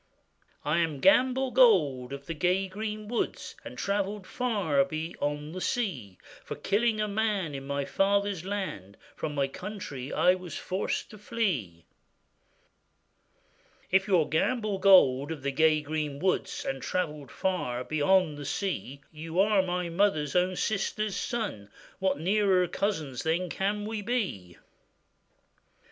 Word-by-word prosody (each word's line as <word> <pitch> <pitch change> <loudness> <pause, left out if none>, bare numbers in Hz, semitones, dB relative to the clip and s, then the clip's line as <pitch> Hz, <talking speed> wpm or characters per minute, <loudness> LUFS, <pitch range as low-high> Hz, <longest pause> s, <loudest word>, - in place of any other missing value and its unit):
'I 150 +3 +2
am 160 -4 0
Gamble 260 - +4
Gold 150 - +4
of 140 0 -7
the 165 - -4
gay 180 +4 +1
green 210 +2 -5
woods, 235 +1 -3
And - - -9
travellèd 200 0 -1
far 195 - +1
beyond 150 0 -4
the 185 - -5
sea; 140 - -2 0.3
For - - -6
killing 215 +2 +1
a 210 - +1
man 205 -6 0
in 135 0 -6
my 140 0 -1
father's 200 -1 +1
land, 185 - -4 0.2
From 150 -1 -4
my 140 -1 +1
country 145 -5 -7
I 180 - +4
was 180 -4 -6
forced 190 +5 -2
to 215 - -12
flee.' 140 - -2 2.1
'If 190 +1 +3
you 190 -4 +4
are 155 - +2
Gamble 205 - 0
Gold 145 -8 +6
of 150 -5 -6
the 140 - 0
gay 155 +1 +3
green 150 -1 -3
woods, 185 +5 -1
And 135 0 -3
travellèd 150 -6 -2
far 125 -10 -2
beyond 155 +2 +2
the - - -6
sea, 145 -8 -3
You 160 +2 -4
are 205 0 +5
my 180 -1 -2
mother's 165 -5 +1
own 180 +1 +2
sister's 215 +1 -1
son; 205 - -3 0.3
What 190 -5 +1
nearer 190 0 +3
cousins 160 - -2
then 170 +3 0
can 205 +2 -1
we 215 0 -3
be? 190 - -3
180 Hz, 140 wpm, -28 LUFS, 145-205 Hz, 2.1 s, Gold